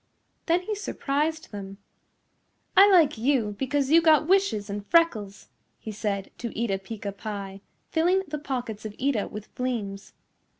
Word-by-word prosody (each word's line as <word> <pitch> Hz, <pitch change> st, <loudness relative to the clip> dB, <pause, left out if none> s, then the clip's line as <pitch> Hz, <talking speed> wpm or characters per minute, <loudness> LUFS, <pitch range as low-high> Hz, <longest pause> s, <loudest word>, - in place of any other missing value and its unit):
Then 350 Hz, +2 st, +2 dB
he 425 Hz, -, -3 dB
surprised 315 Hz, -5 st, -2 dB
them. 195 Hz, -1 st, -7 dB, 1.0 s
"I 395 Hz, +2 st, +8 dB
like 310 Hz, -, +5 dB
you 230 Hz, -5 st, +1 dB
because 275 Hz, +1 st, 0 dB
you 330 Hz, +1 st, +7 dB
got 310 Hz, -2 st, +5 dB
wishes 355 Hz, -, +2 dB
and 205 Hz, 0 st, -5 dB
freckles," 220 Hz, -, +1 dB, 0.3 s
he 220 Hz, -, -7 dB
said 200 Hz, -2 st, -3 dB
to 235 Hz, -, -3 dB
Eeta 210 Hz, -4 st, 0 dB
Peeca 205 Hz, 0 st, -6 dB
Pie, 200 Hz, -2 st, -6 dB, 0.3 s
filling 360 Hz, +4 st, +2 dB
the 300 Hz, 0 st, -4 dB
pockets 245 Hz, -7 st, -4 dB
of 215 Hz, -1 st, -7 dB
Eeta 255 Hz, -6 st, 0 dB
with 210 Hz, 0 st, -9 dB
fleems. 220 Hz, -6 st, -4 dB
245 Hz, 145 wpm, -26 LUFS, 205-315 Hz, 1.0 s, I